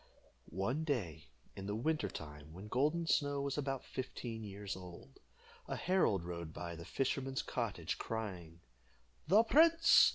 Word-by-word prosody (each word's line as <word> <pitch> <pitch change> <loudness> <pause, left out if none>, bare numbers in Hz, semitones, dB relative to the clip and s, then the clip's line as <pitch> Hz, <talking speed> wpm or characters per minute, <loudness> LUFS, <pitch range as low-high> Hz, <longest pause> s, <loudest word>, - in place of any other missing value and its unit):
One 115 - -1
day, 95 - -2 0.3
in 95 0 -6
the 105 - -1
winter 120 -2 0
time, 75 -1 -8
when 95 +5 -9
Golden 155 +8 +2
Snow 145 -3 +2
was 140 -1 -1
about 135 -2 -2
fifteen 120 -3 -5
years 100 -1 -5
old, 90 -2 -11 0.5
a - - -2
herald 170 - +2
rode 85 -2 -5
by 85 0 -5
the 85 0 -8
fisherman's 135 0 -1
cottage, 100 -8 -2
crying 90 -7 -4 0.7
"The 210 +4 +7
prince! 330 +7 +7
110 Hz, 140 wpm, -36 LUFS, 90-145 Hz, 0.7 s, The